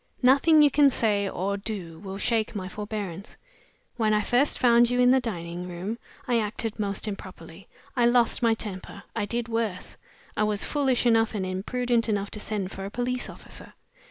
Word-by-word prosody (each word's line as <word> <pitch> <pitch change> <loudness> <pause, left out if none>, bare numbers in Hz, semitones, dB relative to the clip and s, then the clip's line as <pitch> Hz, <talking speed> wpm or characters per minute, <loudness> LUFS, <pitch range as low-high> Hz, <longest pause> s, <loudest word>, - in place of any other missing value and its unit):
Nothing 290 +4 +6
you 290 - +5
can 285 0 +6
say 205 -5 +1
or 200 +2 -2
do 195 -6 -5
will 195 -1 -7
shake 220 +1 0
my 185 -2 -4
forbearance. 205 -2 -6 0.6
When 215 -2 +2
I 210 - +2
first 245 +7 +2
found 235 -1 +5
you 245 0 0
in 250 0 +6
the 265 - +5
dining 175 -6 -5
room, 190 +7 -5 0.3
I 240 -2 +2
acted 220 +1 -3
most 200 0 -1
improperly; 185 -3 -8 0.3
I 240 -2 +4
lost 240 0 +3
my 230 -2 +3
temper. 200 -2 -7
I 215 -3 0
did 235 +2 -2
worse; 225 -5 -3 0.4
I - - -1
was 210 -1 +1
foolish 270 -5 +1
enough 225 -1 +3
and 190 -2 -1
imprudent 230 +5 0
enough 205 -1 -1
to 210 - -5
send 205 -3 -3
for 195 - -7
a - - -4
police 245 +3 -2
officer. - - -10
215 Hz, 185 wpm, -26 LUFS, 195-240 Hz, 0.6 s, Nothing